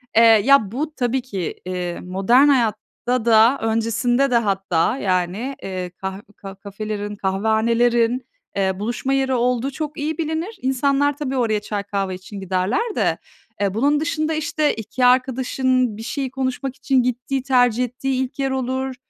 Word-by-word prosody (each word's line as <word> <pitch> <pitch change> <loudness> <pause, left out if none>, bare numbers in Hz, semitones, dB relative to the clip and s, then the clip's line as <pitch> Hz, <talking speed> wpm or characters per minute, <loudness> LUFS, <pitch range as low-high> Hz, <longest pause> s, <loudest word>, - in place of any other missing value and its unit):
Eee, 225 - +7
ya, 225 0 +5
bu 295 +6 -3
tabii 255 0 0
ki, 195 -9 -4
eee, 180 -1 -4
modern 195 +10 +3
hayatta 245 -1 0
da, 230 +3 +5
öncesinde 230 +4 +1
de 240 - +5
hatta, 195 -1 0
yani, 190 +6 -1
eee, 185 -2 -4
kah 190 0 -5 0.2
ka 195 0 -9
kafelerin, 205 +1 -5
kahvehanelerin, 230 +5 +1 0.3
eee, 190 -1 0
buluşma 240 +5 -2
yeri 265 -1 +1
olduğu 250 +2 0
çok 305 +2 -5
iyi 305 +1 -2
bilinir. 330 +6 -3
İnsanlar 275 +2 +1
tabii 270 -3 -3
oraya 220 -4 +1
çay, 205 -1 -4
kahve 195 -2 -2
için 190 +2 -9
giderler 195 - -1
de. - - +1 0.4
Eee, 195 -2 +1
bunun 285 +7 +2
dışında, 320 0 -1
işte, 310 -1 0
2 235 +3 -2
arkadaşın 255 -2 +2
bir 225 - -7
şeyi 265 +2 -3
konuşmak 265 0 -3
için 265 -3 +1
gittiği, 250 +2 -2
tercih 250 -3 +3
ettiği 260 +1 -2
ilk 260 +2 -8
yer 270 -1 0
olur, 260 0 -2
245 Hz, 155 wpm, -21 LUFS, 205-270 Hz, 0.4 s, Eee